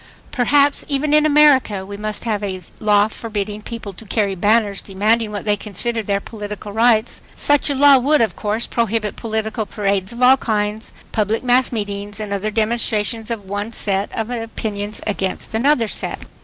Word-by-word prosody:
Perhaps, 280 +3 +3
even 290 +1 0
in 305 0 +5
America, 280 -10 +4
we 200 +1 -7
must 210 +1 -4
have 215 -3 -1
a 190 -2 -4 0.2
law 210 -1 +3
forbidding 210 -2 -5
people 220 -3 -7
to 190 - -8
carry 205 -1 0
banners 205 +1 +1
demanding 210 +3 0
what 205 0 -5
they 210 -1 +2
consider 225 +3 -3
their 200 -1 -1
political 210 -1 -8
rights. 225 0 +2
Such 290 0 +3
a 285 - 0
law 280 0 +7
would, 290 +4 +3
of 225 - +1
course, 215 +2 -2
prohibit 225 -2 -1
political 220 -1 -3
parades 200 -1 -1
of 240 +1 -3
all 260 +2 +7
kinds, 215 -2 -2 0.2
public 215 +2 0
mass 250 +1 +3
meetings 205 -2 -4
and 210 -1 -4
other 200 +2 -2
demonstrations 225 0 0
of 225 -4 -4
one 205 +3 -4
set 200 -1 -1
of 225 +1 -2
opinions 215 -3 -4
against 195 -2 -3
another 235 +1 +2
set. - - -2
215 Hz, 170 wpm, -19 LUFS, 205-235 Hz, 0.2 s, law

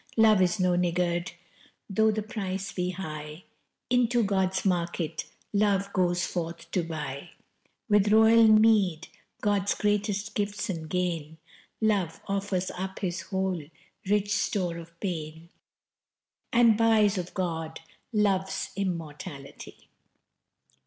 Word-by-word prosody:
Love 215 -3 +6
is 185 +2 +2
no 180 -1 +3
niggard: 175 0 0 0.5
though 220 +2 +3
the 215 0 -1
price 195 -3 -4
be 180 -1 -2
high 155 -3 -6 0.5
Into 245 -1 +3
God's 190 -1 0
market 170 -3 -1 0.3
Love 200 -1 +1
goes 175 -1 +1
forth 170 -1 -5
to 180 - +1
buy 150 -2 -5 0.6
With 210 -2 +4
royal 220 +1 +7
meed 215 -6 +4 0.3
God's 200 -2 +1
greatest 205 0 0
gifts 205 -1 -2
and 160 -3 -6
gain, 165 -3 -2 0.4
Love 195 -7 +1
offers 195 -2 -1
up 190 +1 -5
his 180 -3 -2
whole 190 -1 -2 0.5
rich 205 0 +2
store 180 -7 -1
of 170 0 -13
pain, 160 -3 -5 1.0
And 235 -2 +5
buys 215 -3 +3
of 180 0 -7
God 165 -3 -3 0.3
Love's 195 -3 0
immortality. 155 -6 -6
190 Hz, 115 wpm, -28 LUFS, 170-205 Hz, 1.0 s, royal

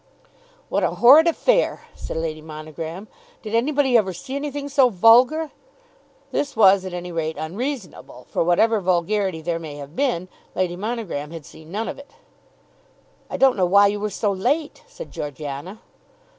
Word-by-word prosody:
"What - - -1
a - - 0
horrid 285 +7 +7
affair!" - - +1
said - - -7
Lady 160 -1 -3
Monogram. 160 +4 -8 0.4
"Did 215 -1 -7
anybody 265 +2 +2
ever 195 -5 +3
see 260 +10 -7
anything 285 0 -4
so 275 -2 +4
vulgar?" 245 - +4 0.8
This 285 - -2
was 195 -3 +5
at 185 - -6
any 180 0 -6
rate 160 -1 -3
unreasonable, 185 - -6
for - - +1
whatever 210 +6 +3
vulgarity 185 0 0
there 170 0 -2
may 155 -3 -8
have 145 +2 -10
been, 215 -10 0 0.3
Lady 180 -2 -1
Monogram 200 -8 -4
had 165 -2 -9
seen 160 +1 -14
none 220 +4 -3
of - - -6
it. 280 - -15 1.2
"I - - -4
don't 270 -1 +4
know 185 -2 +2
why 200 +3 +6
you 205 +1 +1
were 210 +1 -2
so 205 +1 -1
late," 295 - -1
said - - -10
Georgiana. 145 +6 -6
195 Hz, 160 wpm, -22 LUFS, 165-250 Hz, 1.2 s, horrid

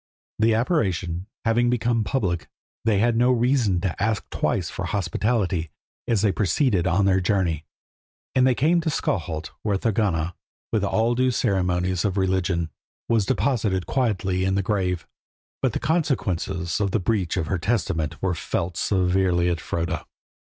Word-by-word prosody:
The 110 0 +4
apparition 95 - 0 0.2
having 120 +2 +3
become 120 -1 +1
public, 95 - -1 0.4
they 110 -3 +3
had 115 +3 +2
no 125 +2 +4
reason 120 -6 +2
to 95 -1 -2
ask 110 0 0
twice - - 0
for - - -4
hospitality 95 -3 0 0.4
as 110 -4 +2
they 105 - +4
proceeded 100 - +1
on 95 +3 +2
their 95 -1 +3
journey, 90 -5 0 0.7
and 130 0 +4
they 130 - +3
came 165 +6 +3
to 160 - -1
Skalholt, 85 - -2
where 105 -2 0
Thorgunna, 95 -6 0 0.4
with 110 -3 +1
all 110 +4 +2
due 130 +1 +2
ceremonies 90 -5 0
of 100 -1 0
religion, 95 -3 0 0.4
was 110 -4 +2
deposited 105 -7 +1
quietly 100 -8 0
in 95 0 +1
the 100 - +1
grave. 90 -4 -1 0.6
But - - +1
the - - -1
consequences 95 - -1
of 100 - +1
the 100 - +1
breach 95 -3 0
of 85 - 0
her 95 +2 -1
testament 90 -6 -1
were 95 -2 +2
felt 85 +1 -3
severely 90 -2 +2
at 85 -2 -1
Froda. 85 -1 -3
95 Hz, 155 wpm, -24 LUFS, 90-115 Hz, 0.7 s, The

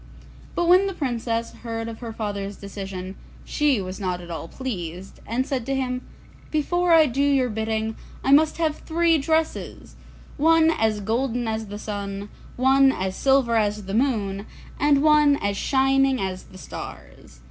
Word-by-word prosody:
But 345 - +1
when 370 +3 +6
the 390 - -4
Princess 230 -5 -2
heard 225 -1 -4
of 225 -1 -7
her 235 -2 -6
father's 205 -2 -4
decision, 195 -2 -7 0.3
she 295 -6 +1
was 185 0 -5
not 180 -3 -2
at 175 -1 -9
all 165 0 -5
pleased, 185 -7 -6
and 245 +4 0
said 270 -4 -2
to 275 - 0
him, 255 -1 -2 0.5
'Before 350 +3 +1
I 325 -2 +7
do 270 0 -1
your 275 -3 +3
bidding, 220 0 -2 0.3
I 270 - +1
must 310 +2 +5
have 315 -2 0
three 330 0 +2
dresses; 315 +3 -2 0.4
one 325 +2 +5
as 220 -7 0
golden 240 +3 -1
as 220 0 -3
the 205 +1 -6
sun, 200 -1 -5 0.3
one 270 +1 +5
as 190 -5 -3
silver 265 -2 +3
as 210 -1 0
the 195 - -5
moon, 215 -5 0 0.3
and 290 -1 +3
one 300 -2 +5
as 200 -6 -2
shining 270 +2 +2
as 185 -1 -4
the 185 - -14
stars. 115 - -10
235 Hz, 165 wpm, -24 LUFS, 205-280 Hz, 0.5 s, I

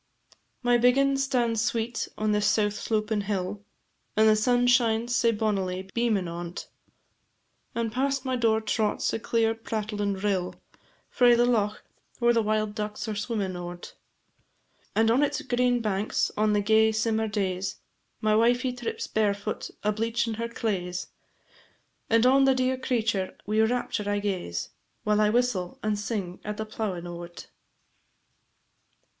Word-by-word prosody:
My 245 0 +4
biggin' 275 +3 +4
stands 245 -5 +1
sweet 230 +1 -1
on 215 0 0
this 210 0 +2
south 210 -1 +2
slopin' 215 0 -1
hill, 200 0 -3 0.5
And 220 0 +6
the 215 - +6
sun 245 +3 +2
shines 240 -1 +3
sae 230 - +3
bonnily 190 -4 -2
beamin' 225 -6 +1
on 170 0 -6
't, - - -6 1.1
And 230 -1 -1
past 270 +2 -1
my 260 -1 0
door 225 -2 +2
trots 215 -1 0
a - - -1
clear 225 0 +1
prattlin' 210 -2 -3
rill, 190 -2 -1 0.5
Frae 245 -2 +5
the 240 +1 +4
loch, 215 -4 0 0.4
whare 240 0 +4
the 230 - +3
wild 215 -1 0
ducks 210 +1 -4
are 215 - -2
swimmin' 205 -3 -2
o't; 175 0 -7 1.0
And 225 +1 +4
on 250 +4 +3
its 295 +1 0
green 245 -2 +1
banks, 210 -1 0
on 215 0 +2
the 205 - +2
gay 220 +1 +4
simmer 220 0 0
days, 195 -3 -2 0.5
My 215 0 +3
wifie 245 +3 +3
trips 240 -1 -4
barefoot, 210 -1 -1
a 210 - +2
bleachin' 230 +1 -1
her 230 0 -3
claes, 180 -6 -3 1.0
And 230 +1 +4
on 270 +1 +5
the 265 -1 +4
dear 255 0 +1
creature 225 -7 -1
wi' 215 +2 0
rapture 220 -2 0
I 205 - +1
gaze, 185 - -3 0.3
While 210 0 +2
I 210 - +4
whistle 215 -6 0
and 210 -1 0
sing 195 -4 -4
at 210 0 -4
the 220 - -3
plowin' 210 -5 -4
o't. 175 0 -8
220 Hz, 150 wpm, -27 LUFS, 205-235 Hz, 1.1 s, And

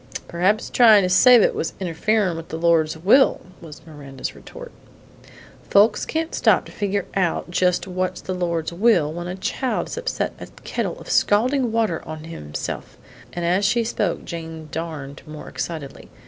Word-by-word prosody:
"Perhaps 190 +6 0
tryin' 220 -5 +6
to 180 - 0
save 240 +4 +7
it - - +2
was 160 - -3
interferin' 190 +1 0
with 165 0 -8
the 160 - -4
Lord's 165 -2 +2
will," 215 - +4 0.2
was 160 -1 -12
Miranda's 140 -4 -7
retort. - - -11 1.0
"Folks 210 +2 +4
can't 320 0 -2
stop - - +3
to - - -12
figure 200 -1 -2
out 180 -2 -1
just 180 0 +1
what's 185 0 -3
the 185 - -5
Lord's 170 -2 -2
will 175 -6 +2
when 175 +1 -5
a 180 - -4
child 250 +6 -2
has - - -6
upset - - -2
a - - -8 0.2
kettle - - -3
of - - -12
scalding 245 +4 +2
water 220 -7 0
on 155 0 -8
to 165 - -10
himself," 75 - -6 0.3
and 175 +3 -4
as 180 +4 +2
she 230 +4 +2
spoke 210 -5 -2
Jane 160 -2 -7
darned 155 -4 -6
more 155 0 -9
excitedly. 155 -5 -6
180 Hz, 170 wpm, -22 LUFS, 160-210 Hz, 1.0 s, save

